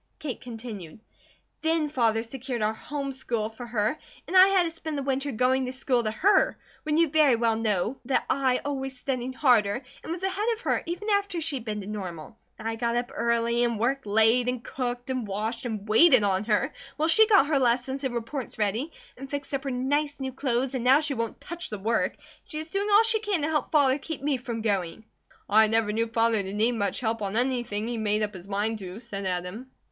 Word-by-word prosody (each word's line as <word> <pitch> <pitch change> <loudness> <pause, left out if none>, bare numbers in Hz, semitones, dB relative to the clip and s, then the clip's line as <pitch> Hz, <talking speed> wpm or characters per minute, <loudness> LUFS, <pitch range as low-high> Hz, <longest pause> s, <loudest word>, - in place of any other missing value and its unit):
Kate 275 -6 -5
continued: 220 -8 -8 0.6
"Then 320 -1 +1
Father 230 -6 +1
secured 245 -1 -4
our 215 +1 +1
home 275 +4 -5
school 235 -4 -2
for 240 +2 -9
her 220 +4 -1 0.3
and 380 - -4
I 370 +1 +9
had 390 -2 +4
to 335 - -2
spend 315 -2 -5
the 280 - -2
winter 275 +1 -1
going 255 +2 +1
to - - -3
school 255 -2 0
to 215 - 0
her, 390 - +3 0.2
when 305 0 0
you 335 0 +5
very 295 -4 +4
well 230 -1 +2
know 220 +2 -1
that 265 - +1
I 260 -2 +1
always 270 -2 -3
studied 255 0 -3
harder, 240 -4 +3 0.2
and - - -7
was 345 +2 -4
ahead 385 +3 -1
of 450 - -9
her, - - 0
even 350 +5 -4
after 400 -3 +1
she'd 290 -7 -3
been 210 -2 -3
to - - -8
Normal. 190 -3 -6 0.2
And 220 - -6
I 225 0 -2
got 235 0 0
up 240 0 -1
early 235 0 +1
and 235 -2 0
worked 260 +2 -1
late, 225 +4 +4
and 250 -1 -3
cooked, 245 0 -4
and 255 -4 -2
washed, 215 +5 -3
and 215 -2 -5
waited 255 +2 +6
on 195 0 +1
her, 210 -2 +1 0.2
while 315 +1 +1
she 430 +7 +6
got 400 -10 +6
her 290 -2 +2
lessons 255 +2 +1
and 260 -3 -2
reports 240 +3 -4
ready, 220 +9 -1 0.3
and 270 0 -8
fixed 285 0 -5
up 275 0 -2
her - - -1
nice 285 +4 -1
new 265 -1 -4
clothes, 255 -1 -1
and 255 -3 -2
now 260 +3 +6
she 300 -2 0
won't 230 -3 -3
touch 345 +1 -7
the 210 - -4
work, 225 +4 0
and - - -29 0.2
she 305 - -7
is 315 +1 -5
doing 400 +1 0
all 415 +2 +7
she 450 -1 +3
can 405 -7 -1
to - - +1
help 305 -1 -1
Father 285 -3 +4
keep 290 -1 -6
me 285 -2 +1
from 240 -3 -5
going." 200 -1 -1 0.4
"I 220 +1 +5
never 220 -1 +1
knew 230 +1 0
Father 225 -1 +2
to 195 0 -6
need 220 +4 +2
much 215 -2 -1
help 225 -2 -1
on 200 +1 -1
anything 240 -4 0
he 235 -1 -3
made 210 0 +1
up 210 0 -2
his 185 0 -10
mind 210 +2 -1
to," 190 +1 -7
said 200 -5 -5
Adam. 180 +8 -4
245 Hz, 225 wpm, -27 LUFS, 220-285 Hz, 0.6 s, I